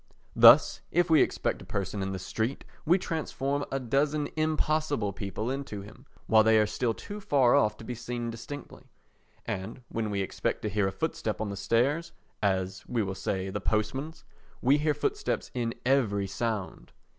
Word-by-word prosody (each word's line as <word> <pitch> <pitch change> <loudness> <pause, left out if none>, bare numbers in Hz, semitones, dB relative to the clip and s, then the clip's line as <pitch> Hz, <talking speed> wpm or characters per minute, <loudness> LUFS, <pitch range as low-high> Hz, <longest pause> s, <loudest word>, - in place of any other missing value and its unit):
Thus, - - +8
if 175 0 +2
we 155 -4 +7
expect - - 0
a - - -10
person 100 0 -3
in 95 0 -2
the 95 - -3
street 110 +7 -3 0.2
we 175 +4 +6
transform 145 -5 -2
a 135 - 0
dozen 145 +4 0
impossible 155 -7 0
people 100 +5 -4
into 130 -7 -5
him 105 - -14 0.2
while 110 -1 +5
they 110 0 +5
are 105 - +5
still 115 +2 -1
too 205 +1 -7
far 135 -10 +3
off 105 -1 +3
to - - -11
be 125 - -4
seen 120 0 -4
distinctly; 130 +6 -9 0.6
and 105 +6 -5
when 110 -1 -2
we 100 -1 -1
expect - - -3
to 105 - 0
hear 100 -1 +1
a - - -1
footstep 115 -5 -2
on 110 -1 -2
the - - -4
stairs—as, 100 - -1
we 120 -3 0
will 95 -1 -3
say, 95 0 -3
the 105 0 -3
postman's—we 135 +5 -1
hear 150 0 +1
footsteps 150 - -2
in 115 -2 -2
every 115 -7 +2
sound. 100 0 -4
115 Hz, 170 wpm, -29 LUFS, 105-145 Hz, 0.6 s, Thus